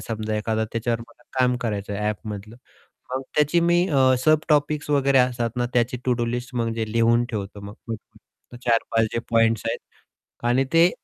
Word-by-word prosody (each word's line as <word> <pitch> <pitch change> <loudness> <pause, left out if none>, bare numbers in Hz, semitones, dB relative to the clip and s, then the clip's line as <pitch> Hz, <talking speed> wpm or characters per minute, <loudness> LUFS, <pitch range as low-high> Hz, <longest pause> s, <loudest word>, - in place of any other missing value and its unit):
समजा 110 -1 -3
एखादा 110 +1 0
त्याच्यावर 115 0 -1
मला 115 +1 -15 0.2
काम 125 -1 +3
करायचं 105 -3 -3
आहे, 105 +1 -2
ॲपमधलं. 105 +1 -6 0.6
मग 130 - -2
त्याची 150 +3 +3
मी 175 +1 +3
अ, 130 -4 +4
सब 155 -1 +5
टॉपिक्स 150 0 +1
वगैरे 140 -1 +4
असतात 120 -2 +1
ना 120 - +1
त्याची 120 +1 +2
टू-डू 125 -2 +1
लिस्ट, 125 +2 -4
म्हणजे 115 -2 -1
लिहून 115 +1 +3
ठेवतो 100 -2 -5
मग 100 +1 -9
पटपट 115 +2 -11
4-5 115 -1 +2
जे 115 - -1
पॉईंट्स 115 -1 +3
आहेत 115 - -1 0.7
आणि 125 +2 +3
ते 165 +2 +6
120 Hz, 170 wpm, -24 LUFS, 110-130 Hz, 0.7 s, ते